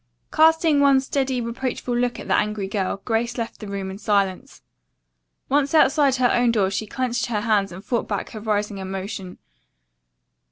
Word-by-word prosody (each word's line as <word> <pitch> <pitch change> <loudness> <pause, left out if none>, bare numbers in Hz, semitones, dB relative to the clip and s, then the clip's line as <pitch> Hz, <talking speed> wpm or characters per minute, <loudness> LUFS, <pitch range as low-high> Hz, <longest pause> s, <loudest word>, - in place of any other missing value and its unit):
Casting 320 -1 +4
one 280 -1 +5
steady, 265 -1 -1
reproachful 240 +1 -3
look 245 0 0
at - - -8
the - - +1
angry 210 -2 0
girl, 195 0 -3
Grace 235 +1 -1
left 230 -1 -4
the 215 - -8
room 195 -1 -4
in 195 - -9
silence. 200 -3 -1 0.8
Once 285 +2 +1
outside 280 -2 +4
her 250 -1 +2
own 240 -1 +3
door 200 -4 +1
she 215 +2 -3
clenched 245 +1 -2
her 215 -3 -1
hands 205 -3 +1
and 185 +4 -10
fought 240 -2 -1
back 205 -2 -3
her 215 - -7
rising 210 -1 -2
emotion. 190 0 -6
225 Hz, 170 wpm, -23 LUFS, 200-255 Hz, 0.8 s, one